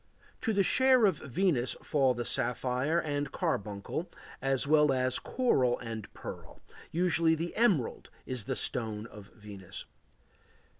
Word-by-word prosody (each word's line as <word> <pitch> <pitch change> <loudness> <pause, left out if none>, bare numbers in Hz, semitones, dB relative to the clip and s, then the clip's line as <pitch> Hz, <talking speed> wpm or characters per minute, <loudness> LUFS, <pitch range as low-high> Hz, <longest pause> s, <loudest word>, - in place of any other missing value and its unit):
To 225 - 0
the 200 -2 +2
share 260 +2 +5
of 185 -7 +2
Venus 140 -3 0
fall 135 -4 +2
the 120 0 -4
sapphire 130 +6 +1
and 145 -3 -3
carbuncle 105 - -3 0.3
as 135 0 +1
well 150 0 +4
as 130 -1 0
coral 130 - +1
and 115 -3 -7
pearl; - - -9 0.3
usually 170 -1 +3
the 165 +2 -4
emerald 200 - +1 0.2
is 125 -5 -3
the - - -2
stone 110 -3 +1
of 105 -3 -12
Venus. 100 -4 -9
135 Hz, 135 wpm, -30 LUFS, 120-170 Hz, 0.3 s, share